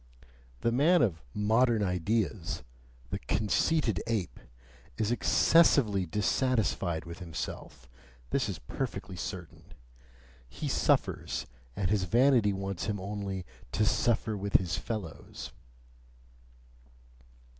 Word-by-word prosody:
The 115 - +2
man 155 +9 +4
of 85 -8 0
"modern 110 - +2
ideas," 90 - -1 0.5
the - - -2
conceited 110 - +1
ape, 110 -6 -2 0.6
is 110 +1 0
excessively 120 - +4
dissatisfied 105 - 0
with 85 0 -8
himself 80 -6 -6 0.4
this - - +1
is - - -3
perfectly - - -5
certain. - - -6 0.9
He - - -5
suffers, - - +1 0.3
and 95 -2 0
his 100 -3 +2
vanity 120 +1 +4
wants 95 -2 -3
him 105 -2 -2
only 95 -1 -4 0.3
"to 105 - +2
suffer 110 0 +1
with 100 0 -4
his 85 -4 +3
fellows." 105 -8 -6
105 Hz, 100 wpm, -30 LUFS, 90-115 Hz, 0.9 s, man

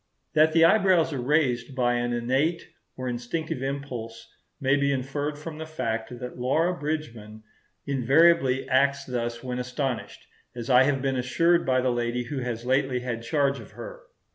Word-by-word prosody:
That 155 +1 +4
the 165 0 +6
eyebrows 185 -4 +4
are 135 - -3
raised 130 -2 +1
by 120 -1 +2
an 120 0 -1
innate 130 +8 0 0.3
or 130 0 -4
instinctive 125 +4 -3
impulse 125 -5 -5 0.3
may 135 -1 +2
be 140 0 +1
inferred 145 +2 -2
from 155 +1 -8
the 160 - -6
fact 115 -6 -3
that 125 0 -8
Laura 160 +8 +1
Bridgman 120 -9 -5 0.4
invariably 135 +1 +3
acts 140 +1 +2
thus 120 -1 -3
when 125 -1 -3
astonished, 125 0 -4 0.3
as 120 +2 -4
I 125 +1 +7
have 135 -1 0
been 135 -1 0
assured 165 +7 +2
by 130 -1 +3
the 130 0 +1
lady 120 0 -1
who 140 +2 -5
has 120 -2 -4
lately 130 -1 +1
had 120 -2 -4
charge 140 +2 0
of - - -13
her. - - -9
130 Hz, 165 wpm, -26 LUFS, 120-150 Hz, 0.4 s, I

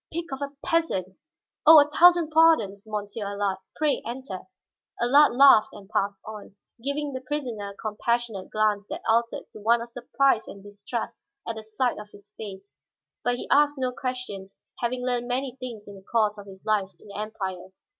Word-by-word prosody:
"Pig 335 +1 -3
of 270 - -5
a 280 0 -3
peasant! 190 - 0 0.5
Oh, 315 0 +10
a 290 - +5
thousand 345 +1 +5
pardons, 310 -12 +4
Monsieur 210 0 -4
Allard; 200 -1 -2 0.2
pray 305 -2 +1
enter." 240 -4 -6 0.6
Allard 270 +3 +5
laughed 270 -5 +7
and 200 -2 -12
passed 200 0 -1
on, 210 -2 -9 0.3
giving 285 +1 -2
the 260 - -4
prisoner 255 -7 -4
a 200 - -11
compassionate 220 -1 -2
glance 215 -1 +1
that - - -6
altered 230 +1 +1
to - - -11
one 230 +3 +3
of 235 +1 -7
surprise 245 0 +1
and 200 - -10
distrust 205 +3 -6 0.3
at 225 -1 -4
sight 220 +3 -1
of 210 0 -10
his 205 0 -17
face. 200 -2 -9 0.5
But 245 0 +1
he - - -6
asked 290 0 +4
no 255 -1 -1
questions, 250 -7 -5 0.2
having 250 +1 -2
learned 245 -1 -1
many 255 +1 -2
things 235 -5 -7
in 205 - -9
the 195 - -12
course 215 -2 +2
of 200 - -11
his 190 -1 -13
life 210 -3 +1
in - - -16
the 200 - -8
Empire. 190 -4 -5
230 Hz, 180 wpm, -26 LUFS, 205-260 Hz, 0.6 s, Oh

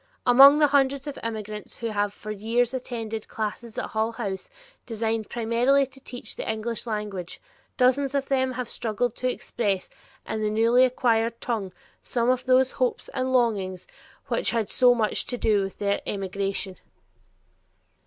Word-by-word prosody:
Among 275 +4 +9
the 300 - +5
hundreds 280 -1 +2
of 290 -2 -6
immigrants 215 -2 -5
who 230 - -4
have 205 -1 0
for 215 +1 -8
years 230 +4 0
attended 225 -4 -4
classes 220 +1 -5
at - - -3
Hull 220 +1 -1
House 200 -5 -4 0.4
designed 225 -1 -2
primarily 240 +4 +2
to 265 +1 -14
teach 245 -4 -7
the - - -2
English 225 +2 -4
language, 210 -5 -4 0.4
dozens 270 +2 +3
of 275 -1 0
them 260 -1 +1
have 250 -1 -4
struggled 230 +1 -2
to 255 - 0
express 205 -6 -2 0.4
in 220 - -2
the 215 - +1
newly 230 +4 +4
acquired 230 -2 +1
tongue 215 -6 -2 0.3
some 240 0 +1
of 255 0 -2
these 260 0 +4
hopes 255 -1 -1
and 260 0 -2
longings 200 -7 +1 0.4
which - - +1
had 230 -3 -1
so 245 -1 +5
much 220 -3 0
to 245 - -2
do 215 -3 +2
with 195 0 -5
their 200 0 0
emigration. 195 -1 -2
230 Hz, 160 wpm, -25 LUFS, 210-255 Hz, 0.4 s, Among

